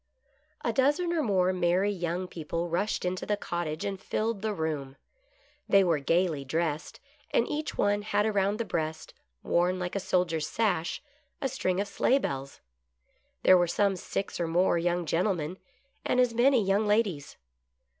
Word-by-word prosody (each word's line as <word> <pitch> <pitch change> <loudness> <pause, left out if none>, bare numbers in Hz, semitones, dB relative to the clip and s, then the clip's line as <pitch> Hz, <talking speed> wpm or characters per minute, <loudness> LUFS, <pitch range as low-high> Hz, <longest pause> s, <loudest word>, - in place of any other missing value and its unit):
A 235 - +1
dozen 295 +8 +2
or 330 - +1
more 185 -7 +2
merry 185 +3 +2
young 175 -1 -3
people 170 0 -4
rushed 180 +3 -1
into 180 0 -2
the 210 - 0
cottage, 170 -5 -3
and 195 -1 -4
filled 220 -2 -2
the 220 0 -1
room. 155 -7 -3 0.7
They 195 -1 +6
were 170 -4 +2
gaily 165 0 +1
dressed, 155 +2 -2 0.3
and 230 - +2
each 300 +1 -3
one 205 0 +2
had 210 0 0
around 205 -1 +1
the 230 - -2
breast, 160 -3 -3 0.3
worn 180 +2 +2
like 180 +1 -4
a - - +1
soldier's 170 -5 0
sash, 205 - -1 0.4
a 270 - 0
string 190 -8 -1
of 200 - -1
sleigh 255 +5 +2
bells. 135 - -4 0.8
There 185 -1 +7
were 175 - +2
some 195 +3 +1
six 195 +1 -4
or 170 - 0
more 175 +2 +2
young 175 0 0
gentlemen 175 0 -1 0.4
and 250 - +1
as 250 -2 +3
many 240 -1 +4
young 200 +2 +2
ladies. 205 -9 0
185 Hz, 165 wpm, -28 LUFS, 170-210 Hz, 0.8 s, There